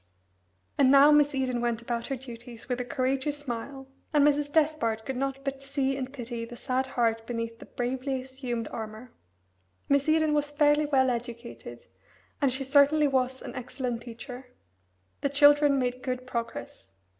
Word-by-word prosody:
And 270 -2 +6
now 280 +2 +8
Miss 295 -1 +4
Eden 255 -2 0
went 235 -1 -1
about 235 -1 -3
her 275 - -2
duties 240 -2 -10
with 250 0 -1
a - - -4
courageous 265 +4 -1
smile, 270 0 -6 0.2
and 295 -2 +4
Mrs. 290 0 +2
Despard 295 -9 +1
could 265 - -3
not 275 +1 -3
but 275 0 -3
see 275 -1 -1
and 265 -1 -4
pity 240 -3 -5
the 235 +1 -8
sad 260 +1 -1
heart 225 -3 0
beneath 230 -1 -4
the - - -12
bravely 260 +2 -2
assumed 255 -3 -4
armour. 220 +2 -7 0.8
Miss 280 +2 +2
Eden 315 -1 +3
was 295 -1 +1
fairly 295 0 +3
well 260 -3 +3
educated, 235 0 -7 0.6
and 275 -2 +3
she 265 +2 -2
certainly 285 +2 +4
was 260 -1 0
an - - -7
excellent 250 -1 -4
teacher. 245 +2 -9 0.7
The 280 - +1
children 290 0 +5
made 250 -1 -1
good 255 -1 -3
progress. 230 - -6
260 Hz, 165 wpm, -28 LUFS, 240-280 Hz, 0.8 s, now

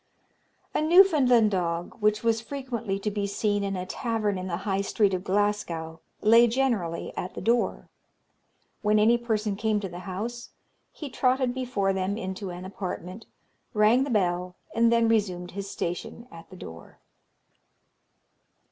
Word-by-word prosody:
A - - +1
Newfoundland 305 - +5
dog, 170 -2 -2
which 215 0 +2
was 225 -1 +2
frequently 235 -6 -4
to 210 +2 -3
be 200 0 -2
seen 205 0 0
in 195 0 -2
a 180 0 -3
tavern 215 0 -1
in 185 - -5
the 170 -2 -2
High 195 -1 +1
Street 200 0 +1
of 185 0 -2
Glasgow, 185 -5 -1 0.2
lay 230 +2 +6
generally 225 -9 -1
at 180 - -5
the - - -4
door. 235 +1 0 0.9
When 210 0 +3
any 230 +3 +4
person 215 -3 -1
came 215 0 0
to 195 -2 -5
the 175 0 -8
house, 235 +6 -5 0.4
he 300 - -7
trotted 255 0 +1
before 240 -7 -1
them 190 +2 -1
into 190 -1 -5
an 180 +1 -7
apartment, 185 +1 -6 0.5
rang 215 +5 +5
the 280 - -4
bell, 180 -4 0 0.2
and 230 0 +3
then 230 -1 +4
resumed 185 -6 0
his 195 +1 -6
station 225 +8 -5
at 165 0 -12
the 185 - -12
door. 80 - -11
210 Hz, 155 wpm, -27 LUFS, 185-230 Hz, 0.9 s, lay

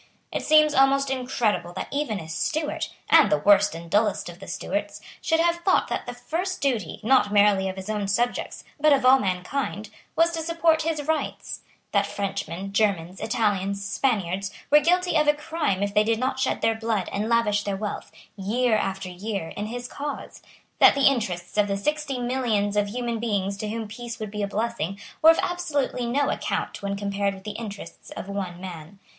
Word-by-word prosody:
It - - -2
seems 305 -1 +5
almost 270 0 +4
incredible 220 -9 -1
that - - -4
even 280 -8 -1
a 160 - -8
Stuart, 295 - -2 0.2
and 315 -10 +6
the 200 - +4
worst 205 -3 +4
and 170 0 -8
dullest 205 0 +1
of 175 +1 -11
the 195 - -10
Stuarts, 205 0 -3 0.2
should 325 0 +1
have 340 0 +3
thought 370 +2 +2
that - - -3
the - - -5
first 365 +3 -3
duty, 240 - -1
not 230 -3 +4
merely 200 -2 +4
of 190 - -5
his 190 0 -8
own 210 -2 -2
subjects, 235 +5 -1 0.2
but 305 0 +5
of 270 -2 +2
all 265 +1 +7
mankind, 205 +2 -2 0.2
was 330 +1 +4
to 330 -1 -3
support 330 -1 +2
his 315 -2 -1
rights; 315 +1 -2 0.3
that 200 -1 +2
Frenchmen, 195 -1 -4
Germans, 190 -4 0
Italians, 200 -4 0
Spaniards, 200 -4 0 0.2
were 295 - +8
guilty 355 +3 +2
of 300 -1 +3
a 295 - +5
crime 300 - -1
if 200 0 -2
they 210 - +5
did 225 +1 +1
not 260 +2 -1
shed - - 0
their 225 0 +3
blood 220 -4 -1
and 210 +3 -1
lavish 220 -3 +2
their 200 -1 -2
wealth, 210 0 -5 0.2
year 220 +4 +1
after 195 -2 -2
year, 185 -1 -4
in 210 - -5
his 245 +2 -5
cause; 290 +3 -6 0.4
that - - +8
the 275 - +2
interests 210 -8 +1
of 205 - +4
the 200 0 -1
sixty 300 +4 -1
millions 240 -5 0
of 205 0 +2
human 235 +1 -3
beings 200 -4 -1
to 210 +1 -4
whom 225 0 -4
peace 235 +2 -7
would 215 -2 -5
be 210 0 -4
a 200 - 0
blessing 205 -3 -2 0.2
were 320 - +8
of 325 - +6
absolutely 290 -8 -1
no 280 +4 +1
account - - -3
when 200 0 -2
compared 200 0 -1
with 190 - -13
the 210 - -4
interests 205 -5 -8
of - - -6
one 190 -3 -4
man. 180 0 -9
215 Hz, 195 wpm, -25 LUFS, 200-270 Hz, 0.4 s, were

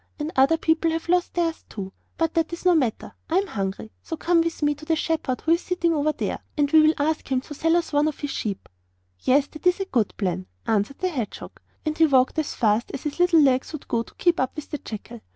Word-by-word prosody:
And 300 +1 -3
other 270 +5 +4
people 320 0 +2
have 325 +1 -3
lost 360 0 +1
theirs 335 -2 -1
too; 190 -2 -7 0.2
but 330 -1 0
that 330 -1 0
is 340 +2 -7
no 360 - +6
matter! 260 -9 0 0.2
I 335 - +2
am 395 - +2
hungry, 200 - -4
so 325 - -6
come 340 +1 +3
with 330 -2 -2
me 295 0 +3
to 290 - -14
the 325 0 +2
shepherd 310 -5 -1
who 325 - 0
is 335 +1 +4
sitting 345 -2 0
over 305 0 +1
there, - - -3 0.2
and 290 -1 +2
we 315 - +7
will 310 +1 +4
ask 300 -1 -1
him 260 - +3
to 295 - -9
sell 325 +3 +2
us 340 -3 -1
one 290 +1 +3
of 305 - -3
his 290 -2 -3
sheep.' 200 -3 -4 0.5
'Yes, 275 - +3
that 310 +3 -3
is 360 +1 +3
a 390 - -1
good 235 - 0
plan,' 180 - -2 0.2
answered 220 +5 0
the 370 - 0
hedgehog. 250 - -5 0.3
And 310 0 -1
he 320 0 +5
walked 260 +1 +3
as 310 - -2
fast 220 +1 +1
as 270 - -7
his 300 +2 -4
little 350 -2 +5
legs 265 +1 +2
would 305 - -7
go 230 - 0
to 230 - -11
keep 345 -2 +2
up 260 - -1
with 305 - -8
the 295 - -3
jackal. 230 +1 -8
305 Hz, 255 wpm, -24 LUFS, 255-330 Hz, 0.5 s, we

